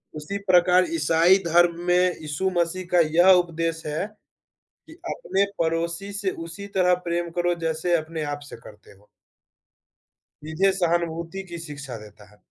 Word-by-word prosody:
उसी 155 +7 -5
प्रकार 180 0 +5
ईसाई 165 +4 +4
धर्म 170 0 +3
में 180 - +4 0.2
यीशु 155 +5 -2
मसीह 175 +2 -1
का 175 - +4 0.2
यह 180 +2 +7
उपदेश 165 -1 -4
है, 150 +5 -2 0.8
कि 320 - -13 0.2
अपने 200 - 0
पड़ोसी 170 +4 -1
से 200 -1 -1 0.2
उसी 200 +5 -8
तरह 180 -1 +4
प्रेम 170 0 -1
करो, 175 0 0
जैसे 165 +2 0
अपने 160 0 -5
आप 145 0 -4
से - - -9
करते 105 0 -16
हो। 100 +1 -21 1.4
सीधे 170 +5 +1
सहानुभूति 170 0 -2
की 170 - -6
शिक्षा 140 -4 -8
देता 105 -1 -15
है। 105 - -22
170 Hz, 150 wpm, -24 LUFS, 160-180 Hz, 1.4 s, यह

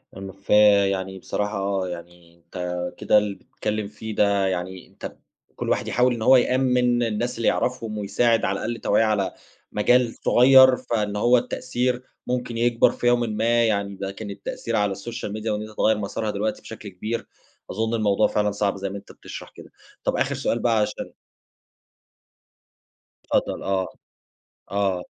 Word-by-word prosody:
ام 95 0 -7
ف 100 +1 -24 0.4
يعني 95 0 -4
بصراحة 100 -1 -2
يعني 85 -1 -10
أنت 85 +2 -13 0.4
كده - - +3
اللي 105 -1 +1
بتتكلّم 105 +1 -4
فيه 105 +1 -7
ده، 100 -1 +2
يعني 95 0 -4
أنت - - -9 0.4
كُلّ - - -4
واحد - - 0
يحاول 125 +1 +2
إن 115 - -5
هو 130 +4 +7
يأمّن 125 -1 +2
الناس 115 +2 -2
اللي 115 - 0
يعرفهم، 115 -4 -1
ويساعد 110 +3 +1
على 100 +1 -1
الأقل 120 +1 -2
توعية 105 - +3
على 105 -3 +1 0.4
مجال 120 +3 +3
صُغيّر، 130 +1 +7
فإن 105 -3 -2
هو 120 +4 +4
التأثير 125 0 -2 0.2
ممكن 125 -2 -2
يكبر 120 0 +3
في 120 - -2
يومٍ 120 0 +4
ما، 115 +1 +1
يعني 100 -3 -1
لكن 100 +2 -5
التأثير 100 +3 -5
على 105 -2 +1
الSocial 110 +3 -6
Media 110 +1 -6
وإن 105 -1 -1
أنت 110 0 -10
تغيّر 110 0 +3
مسارها 105 +1 -3
دلوقتي 105 +2 -2
بشكل 110 -2 -9
كبير، 110 +5 -5 0.4
أظُن 110 +3 -1
الموضوع 105 -3 +2
فعلًا 105 0 0
صعب 100 0 0
زي 100 0 -3
ما 100 - -6
أنت 100 - -12
بتشرح - - -10
كده، - - -13 0.3
طَب - - 0
آخر - - 0
سؤال 115 - -1
بقى 115 -1 +2
عشان 105 - -3 2.2
اتفضل - - 0
آه، 95 -1 0 0.8
آه. 100 -3 0
105 Hz, 160 wpm, -24 LUFS, 100-120 Hz, 2.2 s, هو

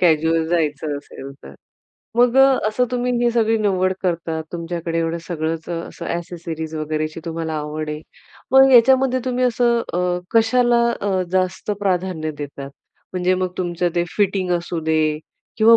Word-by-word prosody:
कॅज्यूअल 160 -1 +3
जायचं 155 -3 0
असेल 140 -1 -9
तर. - - -11 0.6
मग 245 +1 +4
अ, 270 - +8 0.3
असं 235 +4 +1
तुम्ही 250 0 0
ही 240 - +3
सगळी 225 -1 +2
निवड 185 -3 +1
करता, 165 -3 -1
तुमच्याकडे 170 -1 -3
एवढं 165 0 -1
सगळंच 160 -1 -3
अ, - - -3 0.2
असं - - -8
ॲक्सेसरीज 165 -2 -5
वगैरेची 155 +1 -3
तुम्हाला 165 -1 -3
आवड 150 +1 -4
आहे. 150 0 -5 0.5
मग 265 0 +7
याच्यामध्ये 260 +1 +5
तुम्ही 255 0 0
असं 240 -1 +2
अ, 180 0 0 0.2
कशाला 240 +1 +4 0.2
अ, 195 -2 0
जास्त 185 +2 0
प्राधान्य 180 -5 -1
देतात? 140 -1 -7 0.4
म्हणजे 185 0 +1
मग 185 -1 -2
तुमचं 175 -1 0
ते 175 0 +1
फिटिंग 195 -3 +1
असू 170 0 -4
दे 155 -1 +1 0.4
किंवा 230 +1 +7
175 Hz, 150 wpm, -21 LUFS, 160-220 Hz, 0.6 s, अ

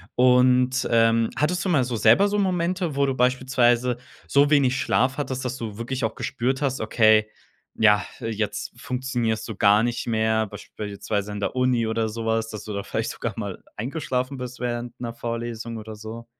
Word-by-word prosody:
Und, 125 +1 +4
ähm, 115 0 +3
hattest 170 +6 0
du 190 - -1
mal 140 -7 +3
so 120 -1 -3
selber 195 - +5
so 205 0 0
Momente, 180 -4 0
wo 140 0 +2
du 135 - 0
beispielsweise 125 -1 +2 0.3
so 140 +1 +4
wenig 135 -3 +3
Schlaf 130 +3 +1
hattest, 130 -2 -3
dass 125 +1 -3
du 110 -4 -6
wirklich 125 +3 -4
auch 110 0 -1
gespürt 130 +4 -2
hast, 130 -3 -1
okay, 110 -1 +4 0.5
ja, 105 -1 +4 0.2
jetzt 105 -2 -3
funktionierst 120 -4 -2
du 110 - -6
gar 105 +3 +4
nicht 120 0 -2
mehr? 110 -1 +1
Beispielsweise 105 0 -5
in 105 - -5
der 100 - -2
Uni 125 -2 +2
oder 110 0 -1
sowas, 115 0 -1
dass 110 - -7
du 105 - -6
da 100 - -2
vielleicht - - -3
sogar - - -4
mal - - -5
eingeschlafen 130 +1 -3
bist 125 0 -7
während 120 -1 -4
'ner 120 -1 -4
Vorlesung 115 -1 -5
oder 110 0 -8
so? 110 +2 -8
120 Hz, 180 wpm, -24 LUFS, 110-130 Hz, 0.5 s, selber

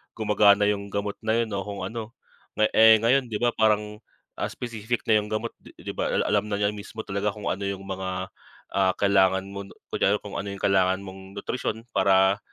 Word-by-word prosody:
gumagana 105 -1 +4
yung 100 -1 0
gamot 100 0 -3
na 110 0 0
'yun 110 - -7
o 100 - -1
kung 100 -2 -5
ano. 110 +3 -6 0.4
Na 110 0 +2
eh, 110 0 +8
ngayon 125 +2 +3
'di 110 - -5
ba, 120 +3 +2
parang, 105 -1 +1 0.4
as - - -3
specific 120 -1 -3
na 110 -1 +4
yung 105 - -5
gamot 110 +2 -3
'di - - -17
'di - - -7
ba, - - -2
al - - +1
alam 105 0 +1
na 105 - -1
niya 100 0 +1
mismo 105 +2 -8
talaga 100 +1 -2
kung 105 - -3
ano 100 - -4
yung 100 0 -4
mga, 95 -1 -4 0.4
ah, 95 -1 +3
kailangan 95 -1 +3
mo 100 0 -6
'no, - - -16 0.2
kunwari 100 - +2
kung 105 - -8
ano 100 - -5
yung 100 - -7
kailangan 95 -1 +3
mong 95 0 -11
nutrisyon 115 -2 -3
para 95 +1 +4
100 Hz, 210 wpm, -25 LUFS, 95-110 Hz, 0.4 s, eh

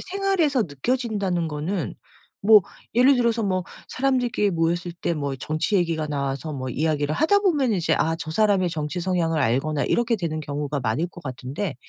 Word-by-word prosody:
생활에서 375 - +1
느껴진다는 195 - -1
거는 160 +5 -3 0.5
뭐 210 0 +7 0.3
예를 255 +3 +5
들어서 235 -2 +1
뭐 185 -3 0 0.2
사람들끼리 250 -6 +1
모였을 170 +1 0
때 170 0 -2
뭐 140 -2 -2
정치 155 - -2
얘기가 165 -4 0
나와서 140 0 -3
뭐 130 -2 -4
이야기를 150 +1 0
하다 405 - +3
보면 295 - +2
이제 180 -6 +1
아 165 - +1
저 165 -1 -6
사람의 195 -1 +2
정치 155 +2 -3
성향을 170 -3 0
알거나 140 +4 +1
이렇게 235 -1 +1
되는 165 -5 -3
경우가 145 -1 -3
많을 125 +7 0
것 175 0 -13
같은데 135 +6 -4
170 Hz, 375 characters per minute, -24 LUFS, 150-225 Hz, 0.5 s, 뭐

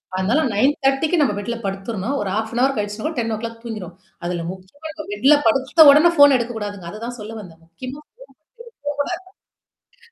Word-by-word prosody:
அதனால 195 +10 +1
9.30 270 +5 +2
க்கு 345 -4 +2
நம்ம 255 -7 +2
பெட்ல 235 +3 -4
படுத்துறணும். 195 +5 -3
ஒரு 200 - -2
1/2 240 +5 0
கழிச்சு, 210 +7 -3
10 225 -1 -1
ஓ - - -5
கிளாக் 230 0 -6
தூங்கிருவோம். 200 -7 -7 0.3
அதுல 175 -1 -3
முக்கியமா 190 +13 -11
நம்ம 310 - -7
பெட்ல 265 +8 +5
படுத்த 270 +7 +5
உடனே 305 +4 +6
ஃபோன் 285 -1 +8
எடுக்கக்கூடாதுங்க. 210 -6 -5
அததான் 235 +3 -7
சொல்ல 215 +1 -7
வந்தேன். 165 -4 -14
முக்கியமா 255 - -8
ஃபோன் 460 - -65 1.8
எடுக்கக்கூடாது. 470 -1 -26
230 Hz, 160 wpm, -21 LUFS, 205-275 Hz, 1.8 s, ஃபோன்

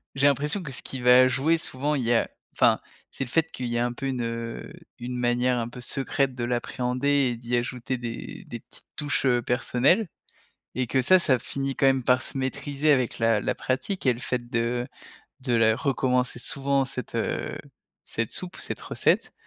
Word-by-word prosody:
j'ai 140 +1 +4
l'impression 150 +7 +1
que 150 -6 -7
ce - - -5
qui 130 - -5
va 125 +1 +7
jouer 135 +6 +2
souvent, 150 -1 -1
il 130 - -1
y 120 - +2
a, 115 - +2 0.2
enfin, - - +4 0.3
c'est - - -4
le 130 - -7
fait 165 +4 +1
qu'il 125 - -5
y 120 0 -1
a 120 - +2
un 120 - -2
peu 135 - -6
une, 130 -2 -2
heu, 115 0 -4 0.3
une 125 +1 -5
manière 125 +1 +2
un 115 - -3
peu 125 - -10
secrète 135 +1 0
de 120 - -4
l'appréhender 125 +2 -1 0.2
et - - -5
d'y 120 +1 -2
ajouter 125 +1 -2
des 120 -1 -6
des - - -6
petites - - -15
touches, 145 -1 -1
heu, 125 -2 +3
personnelles. 130 - +2 0.7
Et 125 -2 0
que 130 +3 +2
ça, 185 +9 +6
ça 130 -7 +2
finit 135 +1 -3
quand - - +2
même 135 -1 +3
par 125 +1 +3
se - - -6
maîtriser 140 +3 0
avec 130 -4 +2
la 115 -2 +3
la - - -1
pratique 135 +8 -2
et 125 - +5
le 120 - -9
fait 125 -1 -3
de 120 +1 0 0.5
de 130 -2 0
la 110 -1 +4
recommencer 125 -3 0
souvent 140 +2 +1
cette, 130 -3 -6
heu, - - -2 0.5
cette 115 -1 -3
soupe 180 0 -1
ou - - -8
cette - - -4
recette. - - +1
125 Hz, 205 wpm, -26 LUFS, 120-135 Hz, 0.7 s, va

